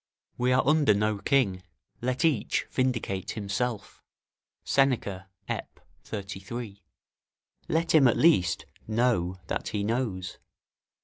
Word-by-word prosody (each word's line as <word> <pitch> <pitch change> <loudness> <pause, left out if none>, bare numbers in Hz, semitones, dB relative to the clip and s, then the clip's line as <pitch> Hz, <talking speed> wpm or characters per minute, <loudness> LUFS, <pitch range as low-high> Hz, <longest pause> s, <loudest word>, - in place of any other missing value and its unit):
["We 125 +1 +1
are 130 +1 +3
under 150 -8 +4
no 105 0 0
king; 105 -8 +2 0.4
let 130 +6 0
each 145 -10 +1
vindicate 115 -7 -1
himself." 105 +2 -3 0.6
Seneca, 105 -9 +1 0.2
Ep.,33] 100 +1 -7 0.9
Let 165 +1 +1
him, 145 -4 +7
at 120 - +3
least, 90 - +3 0.2
know 110 -6 +1
that - - -3
he 105 -1 -2
knows. 105 -5 -2
110 Hz, 105 wpm, -28 LUFS, 100-130 Hz, 0.9 s, him